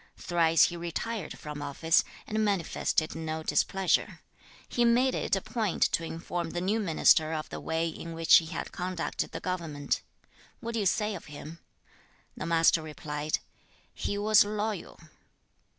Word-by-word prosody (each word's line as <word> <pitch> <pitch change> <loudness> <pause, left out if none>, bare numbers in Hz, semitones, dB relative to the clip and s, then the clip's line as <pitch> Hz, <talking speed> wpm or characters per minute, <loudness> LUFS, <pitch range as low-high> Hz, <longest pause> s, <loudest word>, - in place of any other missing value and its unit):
Thrice 165 -2 +3
he 175 - +2
retired 180 +5 -4
from 150 -1 -7
office, 150 +4 +2 0.2
and 215 0 -1
manifested 175 -5 0
no 160 0 -4
displeasure. 190 +3 +1 0.5
He 240 - +1
made 245 +2 +4
it - - 0
a 195 - -2
point 220 -4 -1
to 165 - 0
inform 165 +1 -4
the 175 - -3
new 200 +5 0
minister 160 -4 +4
of 155 -1 -4
the - - -6
way 165 +1 -1
in 165 0 -6
which 165 0 +6
he 165 - 0
had 170 - -5
conducted 180 -2 -3
the - - -5
government; 165 -6 -2 0.6
what 235 0 -5
do 230 - 0
you 200 - +2
say 210 +3 +1
of 180 - -7
him?' 150 +3 -9 0.8
The - - -5
Master 165 0 +4
replied. 150 -1 -3 0.6
'He 205 - -3
was 215 +1 +6
loyal.' 210 -1 -3
170 Hz, 155 wpm, -29 LUFS, 160-205 Hz, 0.8 s, which